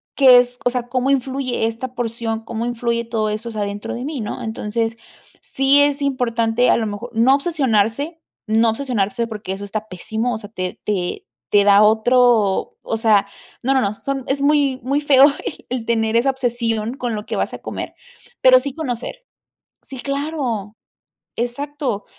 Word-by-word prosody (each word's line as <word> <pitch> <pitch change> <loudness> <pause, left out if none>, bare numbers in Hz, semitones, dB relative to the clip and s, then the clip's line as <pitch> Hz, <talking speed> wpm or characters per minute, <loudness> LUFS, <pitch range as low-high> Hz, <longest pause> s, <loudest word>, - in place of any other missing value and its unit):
qué 255 -3 +8
es, 245 0 -1
o - - +5
sea 245 -1 -3
cómo 255 +2 +1
influye 260 -3 0
esta 230 +3 -5
porción, 230 -2 -2
cómo 230 0 -4
influye 235 -1 -1
todo 220 -2 -1
eso, 215 +3 -4
o - - -7
sea 215 -2 -4
dentro 205 0 -4
de 240 - -5
mí, 290 0 -4
¿no? 215 -2 -5
Entonces 225 +1 -2 0.4
sí 270 +2 +3
es 285 0 +2
importante 245 -3 +1
a - - +4
lo 220 -2 -1
mejor 210 +4 -6
no 235 +4 +5
obsesionarse 280 0 0 0.3
no 225 +1 +3
obsesionarse 230 -3 -1
porque 210 -4 -5
eso 195 +1 -7
está 215 +1 -5
pésimo, 220 +6 -3
o 215 - -2
sea 205 -1 -10
te 185 -4 -5
te 180 - -1
da 200 0 +6
otro 220 -1 +3
o 225 - -2
sea 215 -3 +3 0.4
no, 270 +3 +2
no, 265 - +3
no. 200 -1 -1
Son 270 +2 -4
es 275 +1 -1
muy 285 -2 +2
muy 275 +4 0
feo 275 -2 +6 0.4
el 250 -2 -3
tener 225 -1 +1
esa 250 +4 +3
obsesión 235 -3 -1
con 245 -4 -3
lo 210 0 -5
que - - -3
vas - - -1
a - - -9
comer - - -6 0.5
pero 255 0 +7
sí 270 +1 -5
conocer. 315 - -5 0.6
Sí, 265 -2 -10
claro. 275 -7 -3 0.6
Exacto. 250 -2 -3
235 Hz, 175 wpm, -20 LUFS, 220-265 Hz, 0.6 s, qué